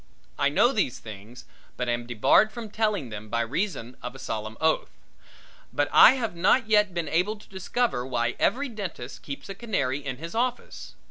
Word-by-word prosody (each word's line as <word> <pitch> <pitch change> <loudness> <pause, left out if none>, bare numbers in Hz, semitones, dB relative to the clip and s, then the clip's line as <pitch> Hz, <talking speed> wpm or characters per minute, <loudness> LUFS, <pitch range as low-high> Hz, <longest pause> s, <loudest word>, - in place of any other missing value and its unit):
I - - +3
know - - +4
these - - 0
things, 110 +3 -11 0.3
but 125 - -2
am 120 0 -1
debarred 120 - +4
from 225 -3 -7
telling 210 - 0
them 105 0 -8
by 115 +1 0
reason 125 - -3
of 125 +1 -6
a - - -8
solemn 110 -4 -5
oath. 160 0 +1 0.8
But 145 - 0
I 240 - +9
have 230 -8 -3
not 200 +7 +3
yet 210 -2 +4
been 170 -2 -3
able 180 +8 +1
to 210 - -17
discover 190 - -1
why 120 -2 -1
every 275 +7 +1
dentist 190 - -7
keeps 140 -1 -7
a 195 - -5
canary 145 - -2
in 130 -2 -4
his 165 +4 -7
office. 245 +2 -3
160 Hz, 185 wpm, -26 LUFS, -, 0.8 s, I